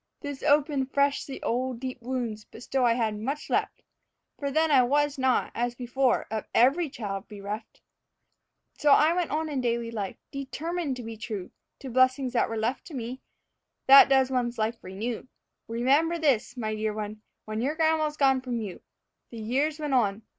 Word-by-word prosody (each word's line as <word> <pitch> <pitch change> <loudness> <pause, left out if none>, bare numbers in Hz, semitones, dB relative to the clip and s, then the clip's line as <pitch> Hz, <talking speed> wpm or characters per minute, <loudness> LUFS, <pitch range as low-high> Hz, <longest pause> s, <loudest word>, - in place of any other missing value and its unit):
This 285 -2 -6
opened 285 -2 +2
fresh 280 0 +2
the 270 - -7
old 250 0 -1
deep 255 -1 -5
wounds; 235 -4 -3
but - - -13
still 265 0 0
I 235 -1 +4
had 220 -3 -1
much 275 +7 -4
left, - - -1 0.6
For 280 - -2
then 315 +2 +2
I 270 -3 +7
was 285 +2 +1
not, 260 -1 +2
as 240 +1 -2
before, 250 +1 +1
of 220 -1 -3
every 285 +7 +4
child 200 -6 -5
bereft. 210 +1 -7 1.0
So 295 -1 +4
on - - +7
I 315 +2 +4 0.2
went 310 0 -2
in 270 -3 -1
daily 235 -1 -1
life, 205 -4 -4 0.2
determined 285 +3 -3
to 250 - -7
be 225 0 -7
true 210 -4 -6 0.3
To 265 -2 -7
blessings 255 +1 +3
that 240 - +2
were 225 - -3
left 225 +5 -2
to 325 - -9
me. 250 +1 -5 0.6
That 275 0 +9
does 265 -1 +4
one's 245 -2 -1
life 225 +1 -2
renew, 220 +7 -5 0.4
Remember 275 +9 +2
this, 270 -6 +1
my 215 -2 -2
dear 215 0 -2
one, 215 0 -5 0.2
when 215 +1 -3
your 285 +5 0
grandma's 315 -2 +1
gone 270 -2 +3
from 250 -2 -3
you. 205 -5 -6 0.5
The 235 - -10
years 275 +8 -1
went 295 -2 -2
on. 220 -4 +1
255 Hz, 180 wpm, -27 LUFS, 225-280 Hz, 1.0 s, That